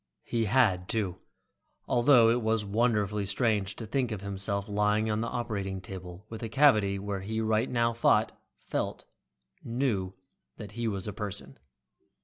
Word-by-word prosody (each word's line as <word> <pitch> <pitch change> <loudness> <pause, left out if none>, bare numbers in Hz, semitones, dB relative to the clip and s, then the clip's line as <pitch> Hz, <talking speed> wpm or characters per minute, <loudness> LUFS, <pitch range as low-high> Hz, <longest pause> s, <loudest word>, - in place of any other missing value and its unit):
He 115 -1 -1
had, 100 -6 +2
too, 100 -6 -1 0.7
although 120 -2 +5
it 120 +1 +1
was 110 -1 +1
wonderfully 105 -2 +1
strange 100 -1 0
to 115 - -7
think 125 +3 -1
of 105 -3 -4
himself 100 0 -2
lying 105 +1 +1
on 105 +1 0
the 115 - -1
operating 100 -6 -3
table 95 0 -9
with 110 -1 -8
a 115 - -4
cavity 110 -9 +4
where 100 0 -4
he 110 +3 -3
right 110 +2 +1
now 115 -1 +1
thought, 115 - +3 0.3
felt, - - -3 0.6
knew 115 -7 -1 0.4
that 105 -2 -8
he 120 +2 -3
was 100 -3 -3
a 105 - -4
person. 100 -8 -5
105 Hz, 155 wpm, -29 LUFS, 100-115 Hz, 0.7 s, although